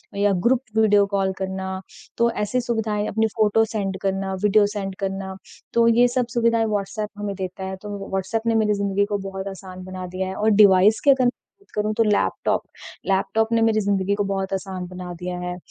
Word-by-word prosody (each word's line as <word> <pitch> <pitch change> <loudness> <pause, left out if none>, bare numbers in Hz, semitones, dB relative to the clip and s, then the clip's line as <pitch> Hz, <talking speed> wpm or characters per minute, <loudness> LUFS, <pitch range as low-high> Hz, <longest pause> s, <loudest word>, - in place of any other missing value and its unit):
या 205 0 +2 0.2
group 255 0 +3 0.2
video 205 -2 +5
call 195 -1 +1
करना। 190 0 -4 0.4
तो 235 0 +3
ऐसी 230 +3 -1
सुविधाएँ, 220 -3 -1
अपनी 220 +1 +1
फ़ोटो 220 0 +3
सेंड 200 -3 -3
करना, 195 0 -1
वीडियो 210 0 +5
सेंड 200 -2 -4
करना। 195 0 -3 0.4
तो 235 0 +4
ये 235 +2 +5
सब 245 0 0
सुविधाएँ 230 -1 +2
व्हाट्सएप 210 0 -2
हमें 205 -1 -3
देता 190 0 -5
है, 190 0 -4
तो 205 -2 -6
व्हाट्सएप 195 +4 -1
ने 230 - +2
मेरी 215 -1 +3
ज़िंदगी 200 0 +1
को 205 0 -2
बहुत 190 0 -6
आसान 185 -1 -8
बना 185 0 -6
दिया 185 +1 -3
है 190 - -5
और 215 +1 +2
डिवाइस 205 0 +6
की 285 - +4
अगर 265 -1 +3
मैं - - +5 0.3
बात 400 - -27
करूँ, 210 +1 0
तो 230 +1 +2
लैपटॉप 210 -2 +1 0.5
लैपटॉप 215 +3 +1
ने 230 - +3
मेरी 225 -1 +3
ज़िंदगी 200 -1 +1
को 205 - 0
बहुत 195 -1 -2
आसान 190 -1 -4
बना 180 0 -7
दिया 180 0 -4
है। 180 0 -4
200 Hz, 205 wpm, -23 LUFS, 190-220 Hz, 0.5 s, डिवाइस